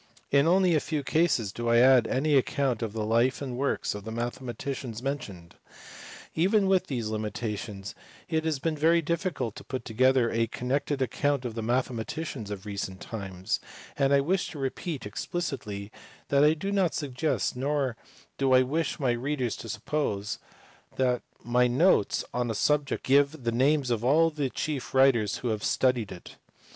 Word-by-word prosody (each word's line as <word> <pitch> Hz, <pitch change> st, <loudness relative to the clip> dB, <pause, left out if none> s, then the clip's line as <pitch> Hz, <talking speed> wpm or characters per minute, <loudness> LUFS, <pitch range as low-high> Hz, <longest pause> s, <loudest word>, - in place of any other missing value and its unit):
In 140 Hz, +2 st, +4 dB
only 185 Hz, 0 st, +4 dB
a 155 Hz, -, +4 dB
few 150 Hz, -1 st, -3 dB
cases 135 Hz, -, +1 dB
do 120 Hz, 0 st, -2 dB
I 115 Hz, -, +5 dB
add 125 Hz, -1 st, +6 dB
any 150 Hz, +3 st, +1 dB
account 135 Hz, -2 st, +1 dB
of 110 Hz, -3 st, -3 dB
the 110 Hz, -1 st, -2 dB
life 115 Hz, +4 st, +2 dB
and 130 Hz, -3 st, -4 dB
works 140 Hz, +3 st, -1 dB
of 105 Hz, -1 st, -7 dB
the 110 Hz, -, -6 dB
mathematicians 120 Hz, 0 st, -4 dB
men 140 Hz, +1 st, -1 dB
tioned. 90 Hz, -7 st, -11 dB, 0.8 s
Even 195 Hz, +5 st, +3 dB
with 190 Hz, -1 st, +2 dB
these 120 Hz, -6 st, -2 dB
limitations 105 Hz, -2 st, -4 dB, 0.3 s
it 160 Hz, -1 st, 0 dB
has 160 Hz, -2 st, 0 dB
been 155 Hz, +4 st, -1 dB
very 165 Hz, +3 st, +3 dB
difficult 160 Hz, -, -2 dB
to -, -, -9 dB
put 130 Hz, -2 st, -5 dB
together 130 Hz, +1 st, +3 dB
a 115 Hz, 0 st, +1 dB
connected 135 Hz, +4 st, -1 dB
account 140 Hz, 0 st, 0 dB
of 120 Hz, -, -3 dB
the 115 Hz, -, -4 dB
mathematics 120 Hz, +1 st, -2 dB
of 100 Hz, -1 st, -6 dB
recent 100 Hz, -2 st, -4 dB
times; 95 Hz, -4 st, -4 dB, 0.4 s
and 140 Hz, -1 st, +2 dB
I 140 Hz, 0 st, +5 dB
wish 180 Hz, +6 st, 0 dB
to 155 Hz, -, -9 dB
repeat 135 Hz, 0 st, -4 dB
explicitly 105 Hz, -, -4 dB, 0.4 s
that 140 Hz, 0 st, +4 dB
I 150 Hz, +1 st, +5 dB
do 195 Hz, +5 st, -3 dB
not 195 Hz, -4 st, +1 dB
suggest, 145 Hz, 0 st, -1 dB
nor 135 Hz, -1 st, 0 dB, 0.4 s
do 135 Hz, -1 st, +3 dB
I 130 Hz, 0 st, +7 dB
wish 155 Hz, +5 st, -1 dB
my 130 Hz, -4 st, +2 dB
readers 125 Hz, 0 st, -1 dB
to -, -, -8 dB
suppose, 110 Hz, -3 st, -2 dB, 0.6 s
that 125 Hz, -2 st, +1 dB, 0.2 s
my 125 Hz, +1 st, +3 dB
notes 130 Hz, -, +3 dB
on 120 Hz, -1 st, -1 dB
a 110 Hz, -, -2 dB
subject 145 Hz, +5 st, +1 dB
give 140 Hz, +1 st, +3 dB
the 115 Hz, -, 0 dB
names 135 Hz, +2 st, +2 dB
of 115 Hz, -1 st, 0 dB
all 160 Hz, +6 st, +4 dB
the 145 Hz, -3 st, -2 dB
chief 140 Hz, -1 st, -4 dB
writers 125 Hz, -6 st, +4 dB
who -, -, +1 dB
have 110 Hz, -2 st, -2 dB
studied 125 Hz, -5 st, +1 dB
it. 90 Hz, -, -11 dB
130 Hz, 175 wpm, -28 LUFS, 115-150 Hz, 0.8 s, I